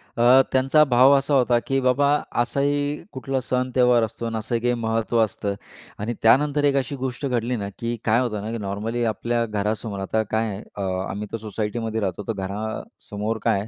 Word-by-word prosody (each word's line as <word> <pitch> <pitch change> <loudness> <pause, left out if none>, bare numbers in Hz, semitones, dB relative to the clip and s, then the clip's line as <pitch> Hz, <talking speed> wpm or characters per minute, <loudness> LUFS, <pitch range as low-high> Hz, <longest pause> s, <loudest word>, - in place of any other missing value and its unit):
अ, 125 +3 +6
त्यांचा 135 +4 +4
भाव 130 0 +5
असा 140 +2 -1
होता, 125 -3 +4
की 135 0 +1
बाबा 130 +2 +3 0.3
असाही 145 +4 -1
कुठला 135 0 -2
सण, 125 0 -1
त्योहार 125 -2 +4
असतो 115 +1 -4
आणि 115 -1 -2
असं 110 +2 -2
काही 120 +1 +1
महत्त्व 115 0 0
असतं. 100 -1 -3 0.4
आणि 110 +3 -2
त्यानंतर 145 +5 +4
एक 140 -1 +3
अशी 135 +1 -1
गोष्ट 130 +1 -4
घडली 125 -1 0
ना, 100 -3 -4
की 120 0 -2
काय 115 +1 +4
होतं 110 -5 -2
ना, 110 +2 -5
की 115 - -3
नॉर्मली 110 +3 -3
आपल्या 115 +2 0
घरासमोर 105 -1 -3
आता 110 +3 0
काय 110 +1 +1
आहे, 100 0 -6
अ, 100 - -5 0.3
आम्ही 105 +2 -4
तर - - -2
सोसायटीमध्ये 110 +1 -3
राहतो, 95 0 -2
तर 115 - 0
घरासमोर 105 +2 -4
काय - - +2
आहे 100 - -5
115 Hz, 195 wpm, -23 LUFS, 110-130 Hz, 0.4 s, अ